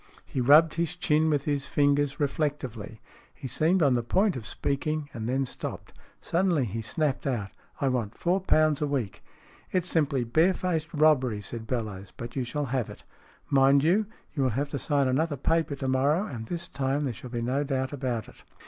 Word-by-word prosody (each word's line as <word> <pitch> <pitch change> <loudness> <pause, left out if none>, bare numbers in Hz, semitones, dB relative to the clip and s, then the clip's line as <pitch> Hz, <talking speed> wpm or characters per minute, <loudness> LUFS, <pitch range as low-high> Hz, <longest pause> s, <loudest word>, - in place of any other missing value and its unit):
He 130 - -3
rubbed 150 +5 +6
his 170 +1 -1
chin 160 -3 +2
with 145 -2 0
his 140 -2 -1
fingers 145 -1 +2
reflectively. 130 -8 -2 0.3
He - - -7
seemed 160 +8 +2
on 140 -3 +4
the 120 - +2
point 190 - +1
of 120 -4 -6
speaking, 145 +1 -2
and 110 0 -4
then 135 +1 +1
stopped. 125 - -7 0.3
Suddenly 170 -6 +1
he 115 +1 -4
snapped 140 +5 -1
out: 110 -7 -2 0.2
" - - -31
I 140 - +2
want 120 -5 -1
four 180 +2 +1
pounds 155 -5 +3
a 150 - +1
week! 130 -8 -3 0.2
" - - -26
" - - -29
It's 180 -1 0
simply 145 -7 +1
bare 160 +11 +3
faced 165 -3 -2
robbery," 145 -8 +3
said 110 +2 -6
Bellowes. 105 -6 -4
" - - -43
But 120 +1 -7
you 130 - 0
shall 145 +4 -2
have 125 -5 0
it. - - -11 0.5
Mind 135 0 +5
you, 195 +6 +3 0.3
you 145 - -1
will 130 - +3
have 140 +5 -2
to 140 - -3
sign 140 -2 +1
another 145 +3 0
paper 160 +1 +1
to 135 -1 -4
morrow, 140 +8 +2
and 115 - -6
this 170 -1 -4
time 135 0 -1
there 135 -4 -1
shall 125 +3 -9
be 120 -1 -3
no 130 +4 0
doubt 135 -1 -2
about 125 -5 -2
it." - - -16
140 Hz, 210 wpm, -27 LUFS, 125-155 Hz, 0.5 s, rubbed